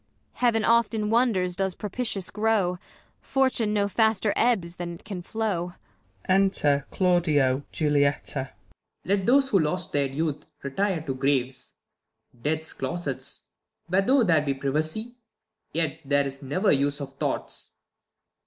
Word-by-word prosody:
Heav'n 230 -3 +2
oft 230 -1 +3
in 210 -1 -1
wonders 210 -7 +2
does 190 -1 -1
propitious 210 -2 -3
grow, 210 -5 +1 0.4
Fortune 260 -5 +1
no 205 -1 +2
faster 220 0 +2
ebbs 185 -8 +1
than 175 -1 -5
it - - -15
can 195 -4 -6
flow. 180 -3 -2 0.5
Enter 185 -7 +2
Claudio, 155 -8 +2
Julietta. 145 -2 0
Claud. - - -25 0.3
Let 195 0 +1
those 270 +2 +5
who 195 - +4
lost 165 +3 -1
their 140 -1 +1
youth 150 +2 -3 0.2
retire 170 +5 0
to 140 -4 -3
graves. 130 -1 -1 0.7
Death's 155 +3 -2
closets, 140 -6 -3 0.4
where, 185 +2 +3
though 260 +5 +4
there 165 -6 +4
be 140 -2 -1
privacy, 155 - -2 0.5
Yet 160 -1 -1
there 140 0 +2
is 135 +1 -6
never 165 +10 +1
use 145 +1 +1
of 135 -1 -6
thoughts. 135 - -3
175 Hz, 135 wpm, -26 LUFS, 145-210 Hz, 0.7 s, those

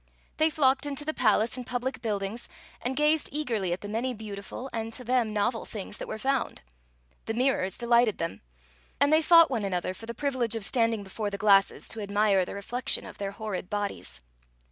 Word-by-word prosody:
They 315 +1 +4
flocked 275 -2 +2
into 285 +1 -4
the 310 - -1
palace 220 -2 +2
and 255 - -5
public 250 +2 -3
buildings, 210 +1 -3 0.3
and 255 +2 -2
gazed 300 +2 +2
eagerly 230 - -1
at 175 - -2
the 205 - -6
many 240 +4 -2
beautiful 210 +3 -7
and, 225 0 -3
to 250 - -6
them, 245 -2 +1
novel 215 +3 0
things 205 -1 -7
that - - -5
were - - -4
found. 265 - -1 0.6
The 225 - -2
mirtx)rs 240 -7 +1
delighted 235 -2 +3
them, 165 -11 -4 0.6
and 285 +2 +4
they 315 - +6
fought 335 -1 +7
one 230 -5 0
another 185 -1 -1
for 225 +4 -11
the 235 - -5
privilege 255 -4 0
of 220 -3 -2
standing 230 -3 +1
before 205 +2 -4
the 200 - -4
glasses 195 -1 +4
to 225 - -5
admire 200 -2 +2
the - - -7
reflection 235 +5 0
of - - -11
their 200 -1 -2
horrid 200 -3 -5
bodies. 200 - -4
225 Hz, 195 wpm, -28 LUFS, 200-260 Hz, 0.6 s, fought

